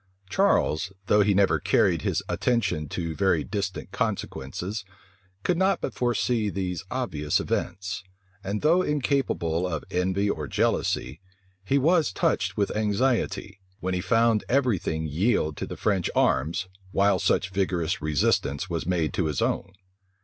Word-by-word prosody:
Charles, 95 Hz, -, +2 dB
though 105 Hz, +1 st, +4 dB
he 100 Hz, -1 st, +3 dB
never 100 Hz, 0 st, +3 dB
carried -, -, +2 dB
his -, -, -1 dB
attention 100 Hz, -, 0 dB
to 85 Hz, -3 st, -3 dB
very 95 Hz, -6 st, +2 dB
distant 100 Hz, -3 st, -4 dB
consequences, 100 Hz, +3 st, -3 dB, 0.6 s
could 175 Hz, -1 st, +1 dB
not 190 Hz, +1 st, +3 dB
but -, -, -3 dB
foresee 120 Hz, -3 st, 0 dB
these 95 Hz, -1 st, -3 dB
obvious 80 Hz, -, -1 dB
events; 95 Hz, +1 st, -3 dB, 0.4 s
and 100 Hz, +5 st, -3 dB
though 165 Hz, +4 st, +5 dB
incapable 135 Hz, -, 0 dB
of 80 Hz, -3 st, -3 dB
envy 95 Hz, +3 st, +1 dB
or 75 Hz, -7 st, -2 dB
jealousy, 65 Hz, +3 st, 0 dB, 0.4 s
he 135 Hz, +8 st, +2 dB
was 160 Hz, -, +3 dB
touched -, -, 0 dB
with 100 Hz, -1 st, 0 dB
anxiety, 105 Hz, -2 st, 0 dB, 0.2 s
when 95 Hz, 0 st, -2 dB
he 90 Hz, -, 0 dB
found 115 Hz, +3 st, +3 dB
every 125 Hz, -7 st, +2 dB
thing 80 Hz, 0 st, -2 dB
yield 80 Hz, 0 st, +1 dB
to -, -, -4 dB
the -, -, -7 dB
French 95 Hz, -5 st, +1 dB
arms, 85 Hz, +9 st, +1 dB, 0.2 s
while 100 Hz, +1 st, +3 dB
such 95 Hz, -, +1 dB
vigorous 95 Hz, -2 st, -1 dB
resistance 75 Hz, +1 st, +1 dB
was 85 Hz, -2 st, -3 dB
made 85 Hz, -4 st, 0 dB
to 90 Hz, -, 0 dB
his 75 Hz, -3 st, -2 dB
own. 100 Hz, -, -1 dB
95 Hz, 145 wpm, -26 LUFS, 85-115 Hz, 0.6 s, though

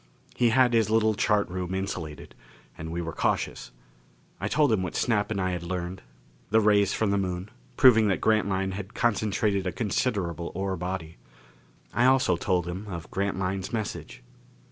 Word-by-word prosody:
He 120 Hz, -1 st, +3 dB
had 125 Hz, +1 st, +4 dB
his 110 Hz, -3 st, +3 dB
little 110 Hz, 0 st, +3 dB
chart 105 Hz, 0 st, +1 dB
room 90 Hz, +1 st, -4 dB
insulated. 90 Hz, -6 st, -5 dB, 0.4 s
And 80 Hz, +1 st, -7 dB
we 85 Hz, +1 st, -3 dB
were 80 Hz, -1 st, -5 dB
cautious. -, -, -1 dB, 0.7 s
I -, -, -2 dB
told 150 Hz, -4 st, +3 dB
him 105 Hz, -4 st, +2 dB
what 90 Hz, -, -4 dB
Snap 105 Hz, -3 st, +1 dB
and 105 Hz, -3 st, -2 dB
I 95 Hz, -1 st, 0 dB
had 90 Hz, -2 st, -3 dB
learned: 90 Hz, +1 st, -4 dB, 0.5 s
the 110 Hz, -, +4 dB
rays 105 Hz, -2 st, +4 dB
from 110 Hz, -3 st, 0 dB
the 100 Hz, -, +2 dB
Moon, 90 Hz, +1 st, -3 dB, 0.3 s
proving 115 Hz, -4 st, +6 dB
that 95 Hz, -, +1 dB
Grantline 100 Hz, -3 st, +1 dB
had 100 Hz, +2 st, -7 dB
concentrated 105 Hz, -3 st, +1 dB
a -, -, 0 dB
considerable 95 Hz, -4 st, -2 dB
ore 95 Hz, 0 st, -1 dB
body. 90 Hz, -2 st, -5 dB, 0.8 s
I 120 Hz, +3 st, +3 dB
also 130 Hz, -8 st, +4 dB
told 90 Hz, 0 st, 0 dB
him 95 Hz, +4 st, -5 dB
of 85 Hz, -4 st, -7 dB
Grantline's 95 Hz, -1 st, -2 dB
message. 110 Hz, -, -5 dB
95 Hz, 165 wpm, -27 LUFS, 90-110 Hz, 0.8 s, proving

